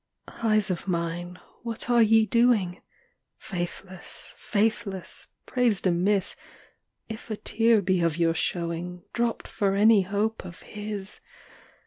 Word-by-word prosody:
XVIII. 230 - -2
Eyes 215 -2 +3
of 180 +1 -4
mine, 175 0 -2 0.2
what 230 -1 -4
are 240 -1 +5
ye 220 0 +5
doing? 220 -6 +2 0.6
Faithless, 180 0 -5
faithless, 210 -3 -2 0.2
praised 240 -7 +2
amiss 190 +2 +2 0.7
If 220 +1 -8
a 215 - -3
tear 225 -1 +3
be 185 -1 +2
of 165 -1 +1
your 165 -1 +3
showing, 170 +1 -3
Dropt 235 -1 -1
for 195 -2 0
any 210 +1 +6
hope 205 +4 -1
of 175 -2 -10
HIS! 210 -2 -4
200 Hz, 125 wpm, -26 LUFS, 180-220 Hz, 0.7 s, any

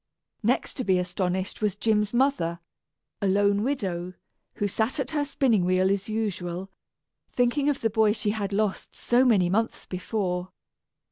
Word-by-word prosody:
Next 240 +4 0
to 255 - -1
be 190 -4 +3
astonished 180 +2 -2
was 210 -3 +1
Jim's 210 -2 +1
mother, 240 -10 +1 0.6
a 200 - +1
lone 200 +1 +3
widow, 185 -9 -2 0.4
who 205 - 0
sat 220 +7 -1
at 270 +1 -2
her 295 -2 +1
spinning 260 -8 +2
wheel 185 +1 +2
as 200 +1 -2
usual, 190 -4 -3 0.6
thinking 250 +4 +2
of 285 - -1
the 225 - +2
boy 220 -1 +4
she 210 -1 -1
had 205 -2 -3
lost 205 -1 -1
so 245 +2 +3
many 210 -8 +4
months 225 +5 -1
before. 180 -1 -3
205 Hz, 155 wpm, -26 LUFS, 185-230 Hz, 0.6 s, boy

